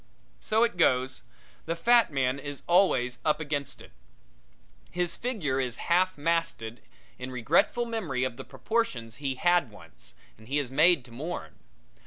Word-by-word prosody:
So 220 Hz, +2 st, +2 dB
it 230 Hz, -6 st, 0 dB
goes 130 Hz, -5 st, +2 dB, 0.5 s
the 165 Hz, -, -1 dB
fat 235 Hz, +5 st, +4 dB
man 135 Hz, -1 st, 0 dB
is 145 Hz, -1 st, -7 dB
always 170 Hz, -9 st, +3 dB
up 150 Hz, 0 st, +2 dB
against 145 Hz, -2 st, -4 dB
it. -, -, -16 dB, 1.0 s
His 175 Hz, -1 st, -1 dB
figure 185 Hz, -, -2 dB
is 125 Hz, -2 st, -2 dB
half 185 Hz, 0 st, +3 dB
masted 145 Hz, -8 st, -1 dB, 0.4 s
in 125 Hz, 0 st, -5 dB
regretful 140 Hz, -, +1 dB
memory 185 Hz, -, -2 dB
of 130 Hz, -2 st, -2 dB
the -, -, -8 dB
proportions 130 Hz, -, -2 dB
he 140 Hz, -2 st, -2 dB
had 175 Hz, -2 st, +2 dB
once, 85 Hz, -7 st, -13 dB, 0.2 s
and 110 Hz, -, -16 dB
he 140 Hz, +3 st, -1 dB
is 140 Hz, -4 st, -1 dB
made 155 Hz, -1 st, +4 dB
to 120 Hz, -, -15 dB
mourn. 155 Hz, +9 st, -6 dB
145 Hz, 155 wpm, -28 LUFS, 125-175 Hz, 1.0 s, fat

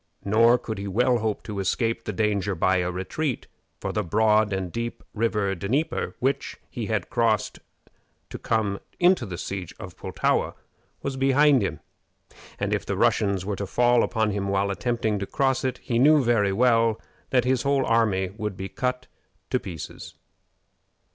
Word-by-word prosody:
Nor 115 Hz, +4 st, +5 dB
could 110 Hz, -4 st, -6 dB
he 100 Hz, -, -4 dB
well 120 Hz, +5 st, +2 dB
hope 110 Hz, -2 st, -2 dB
to 105 Hz, -2 st, -5 dB
escape 115 Hz, +4 st, -1 dB
the -, -, -2 dB
danger 100 Hz, -2 st, 0 dB
by 95 Hz, +3 st, +2 dB
a 90 Hz, -1 st, 0 dB
retreat, 115 Hz, -, -3 dB, 0.3 s
for -, -, -3 dB
the -, -, 0 dB
broad 105 Hz, +3 st, +3 dB
and 95 Hz, -2 st, -2 dB
deep 115 Hz, +3 st, -4 dB
river 105 Hz, -3 st, 0 dB
Dnieper, 110 Hz, -, -1 dB
which 135 Hz, +2 st, -1 dB
he 115 Hz, -4 st, -4 dB
had 105 Hz, -5 st, -2 dB
crossed 115 Hz, -4 st, +1 dB, 0.7 s
to -, -, -6 dB
come 105 Hz, -3 st, 0 dB, 0.2 s
to 175 Hz, -7 st, +4 dB
the 90 Hz, -2 st, -6 dB
siege 95 Hz, -1 st, -5 dB
of -, -, -9 dB
Pultowa, -, -, -1 dB, 0.5 s
was 135 Hz, -1 st, -3 dB
behind 135 Hz, 0 st, +4 dB
him, 100 Hz, -, -3 dB, 0.8 s
and -, -, -1 dB
if -, -, -1 dB
the -, -, -3 dB
Russians 100 Hz, -3 st, +2 dB
were 100 Hz, -1 st, -2 dB
to 100 Hz, -, -4 dB
fall 120 Hz, +3 st, +3 dB
upon 110 Hz, -2 st, +1 dB
him 100 Hz, -1 st, -2 dB
while 100 Hz, 0 st, +1 dB
attempting 110 Hz, +1 st, -1 dB
to 100 Hz, -, -4 dB
cross 135 Hz, -1 st, +1 dB
it, 130 Hz, -1 st, -1 dB
he 120 Hz, -1 st, -1 dB
knew 150 Hz, +2 st, +6 dB
very 115 Hz, -5 st, +2 dB
well 115 Hz, 0 st, +3 dB, 0.3 s
that 125 Hz, -2 st, +2 dB
his 130 Hz, -1 st, +2 dB
whole 140 Hz, -1 st, +1 dB
army 105 Hz, -5 st, +2 dB
would 105 Hz, -3 st, -4 dB
be 95 Hz, 0 st, -5 dB
cut 125 Hz, 0 st, -2 dB, 0.5 s
to 125 Hz, -, +2 dB
pieces. 85 Hz, -9 st, -8 dB
110 Hz, 170 wpm, -25 LUFS, 100-125 Hz, 0.8 s, knew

